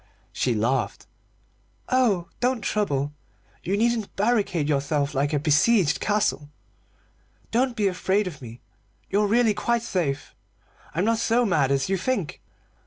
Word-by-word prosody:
She 125 Hz, -3 st, 0 dB
laughed. 115 Hz, 0 st, -1 dB, 0.8 s
"Oh, 220 Hz, -9 st, +2 dB
don't 250 Hz, -1 st, 0 dB
trouble! 145 Hz, -9 st, -1 dB, 0.5 s
You 195 Hz, +3 st, -1 dB
needn't 230 Hz, -1 st, 0 dB
barricade 200 Hz, -7 st, +1 dB
yourself 140 Hz, 0 st, 0 dB
like 145 Hz, +1 st, 0 dB
a 150 Hz, -, +1 dB
besieged 155 Hz, +5 st, +3 dB
castle. 205 Hz, -8 st, 0 dB, 1.0 s
Don't 245 Hz, +1 st, +1 dB
be 210 Hz, -4 st, +1 dB
afraid 190 Hz, +2 st, 0 dB
of 165 Hz, -7 st, -7 dB
me. 115 Hz, -1 st, -10 dB, 0.5 s
You're 205 Hz, +1 st, +2 dB
really 225 Hz, +1 st, +3 dB
quite 235 Hz, +2 st, 0 dB
safe. 160 Hz, -11 st, -2 dB, 0.6 s
I'm 180 Hz, +4 st, +1 dB
not 225 Hz, 0 st, +2 dB
so 235 Hz, +1 st, +2 dB
mad 150 Hz, -10 st, +2 dB
as 135 Hz, -1 st, +1 dB
you 195 Hz, 0 st, 0 dB
think. 195 Hz, -4 st, -2 dB
190 Hz, 135 wpm, -24 LUFS, 145-225 Hz, 1.0 s, besieged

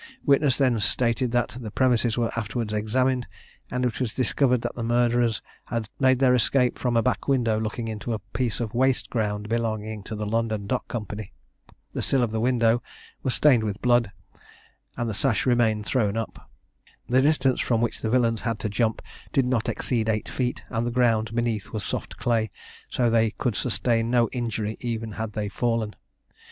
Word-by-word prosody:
Witness 140 Hz, -2 st, +4 dB
then 130 Hz, -5 st, +2 dB
stated 115 Hz, +3 st, +1 dB
that 120 Hz, -1 st, +2 dB
the 115 Hz, -4 st, -6 dB
premises 120 Hz, 0 st, +2 dB
were 115 Hz, -1 st, +1 dB
afterwards 110 Hz, 0 st, -3 dB
examined, 125 Hz, +4 st, +1 dB, 0.4 s
and 125 Hz, 0 st, -1 dB
it 120 Hz, -, -2 dB
was 120 Hz, -5 st, -2 dB
discovered 125 Hz, -1 st, +2 dB
that 120 Hz, -, -2 dB
the 120 Hz, -, -6 dB
murderers 120 Hz, -1 st, +2 dB, 0.2 s
had 115 Hz, -3 st, -3 dB
made 130 Hz, -1 st, +4 dB
their 130 Hz, -1 st, +4 dB
escape 125 Hz, +1 st, +2 dB
from 120 Hz, -2 st, +1 dB
a 115 Hz, -, +3 dB
back 125 Hz, -, -1 dB
window 120 Hz, -6 st, +2 dB
looking 115 Hz, +1 st, -3 dB
into 110 Hz, +2 st, -4 dB
a 110 Hz, -, 0 dB, 0.2 s
piece 125 Hz, -3 st, 0 dB
of 115 Hz, -3 st, -3 dB
waste 130 Hz, +1 st, +1 dB
ground 105 Hz, -2 st, -1 dB
belonging 110 Hz, -2 st, -2 dB
to 110 Hz, -, -5 dB
the 105 Hz, 0 st, -3 dB
London 110 Hz, -1 st, -1 dB
Dock 125 Hz, +4 st, -2 dB
Company. 105 Hz, -3 st, -5 dB, 0.6 s
The -, -, -2 dB
sill 135 Hz, -2 st, +2 dB
of 115 Hz, -, -1 dB
the 110 Hz, -, -1 dB
window 120 Hz, -1 st, +3 dB, 0.4 s
was 130 Hz, -, 0 dB
stained 130 Hz, -7 st, +5 dB
with 105 Hz, -2 st, -3 dB
blood, 120 Hz, -4 st, +3 dB, 0.9 s
and 120 Hz, -, -1 dB
the 110 Hz, -, -2 dB
sash 110 Hz, +2 st, +1 dB
remained 115 Hz, -4 st, +2 dB
thrown 110 Hz, -5 st, +1 dB
up. 115 Hz, -, -6 dB, 0.6 s
The 130 Hz, +2 st, +4 dB
distance 135 Hz, -3 st, +2 dB
which 120 Hz, -1 st, +1 dB
the 110 Hz, -, -1 dB
villains 115 Hz, -2 st, +2 dB
had 115 Hz, -2 st, -1 dB
to 110 Hz, -, -1 dB
jump 110 Hz, +2 st, 0 dB, 0.3 s
did 135 Hz, -, +2 dB
not 125 Hz, -3 st, 0 dB
exceed 115 Hz, -3 st, -1 dB
eight 110 Hz, -1 st, 0 dB
feet, 125 Hz, -1 st, -2 dB
and 115 Hz, 0 st, -1 dB
the -, -, +1 dB
ground 115 Hz, -2 st, +1 dB
beneath 115 Hz, -3 st, -1 dB
was 110 Hz, -3 st, -3 dB
soft -, -, -4 dB
clay; 115 Hz, -2 st, +1 dB, 0.4 s
so 120 Hz, -, +1 dB
they 115 Hz, -1 st, +3 dB
could 115 Hz, +1 st, -2 dB
sustain 115 Hz, 0 st, +1 dB
no 120 Hz, -2 st, +3 dB
injury 110 Hz, -3 st, -3 dB
even 115 Hz, -2 st, -3 dB
had 110 Hz, 0 st, -5 dB
they 105 Hz, -1 st, -2 dB
fallen. 115 Hz, 0 st, -1 dB
115 Hz, 185 wpm, -25 LUFS, 110-125 Hz, 0.9 s, stained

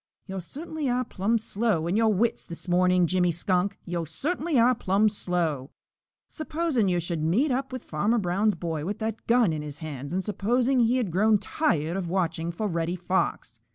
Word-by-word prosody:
"Yo' 190 Hz, -1 st, -5 dB
cert'nly 300 Hz, -, -4 dB
are 250 Hz, +1 st, 0 dB
plumb 220 Hz, +3 st, 0 dB
slow 215 Hz, -6 st, 0 dB
in 175 Hz, +3 st, 0 dB
your 220 Hz, 0 st, +4 dB
wits 225 Hz, +4 st, 0 dB
this 170 Hz, +2 st, -7 dB
morning, 180 Hz, 0 st, +3 dB
Jimmy 180 Hz, 0 st, +2 dB
Skunk, 185 Hz, +3 st, 0 dB
yo' 170 Hz, -1 st, -2 dB
cert'nly 305 Hz, -, -1 dB
are 245 Hz, +2 st, +5 dB
plumb 205 Hz, -2 st, +2 dB
slow! 170 Hz, -9 st, -1 dB, 0.6 s
Supposing 310 Hz, -, -1 dB
yo' 175 Hz, -, +1 dB
should 170 Hz, -2 st, -2 dB
meet 215 Hz, -, +2 dB
up 265 Hz, +1 st, -1 dB
with 255 Hz, -2 st, -6 dB
Farmer 205 Hz, +10 st, 0 dB
Brown's 200 Hz, +2 st, +1 dB
boy 165 Hz, -3 st, -3 dB
with 195 Hz, +5 st, -3 dB
that 220 Hz, 0 st, -4 dB
gun 230 Hz, -7 st, +4 dB
in 155 Hz, -, -3 dB
his 150 Hz, -1 st, -7 dB
hands 145 Hz, -3 st, -6 dB
and 190 Hz, +2 st, -1 dB
supposing 245 Hz, +5 st, +1 dB
he 240 Hz, +2 st, +3 dB
had 225 Hz, -8 st, -1 dB
grown 210 Hz, +5 st, +4 dB
tired 175 Hz, -, 0 dB
of 180 Hz, -3 st, -3 dB
watching 170 Hz, -2 st, -1 dB
fo' 190 Hz, +6 st, -4 dB
Reddy 170 Hz, -2 st, -1 dB
Fox. 185 Hz, +1 st, -2 dB
195 Hz, 190 wpm, -26 LUFS, 170-235 Hz, 0.6 s, are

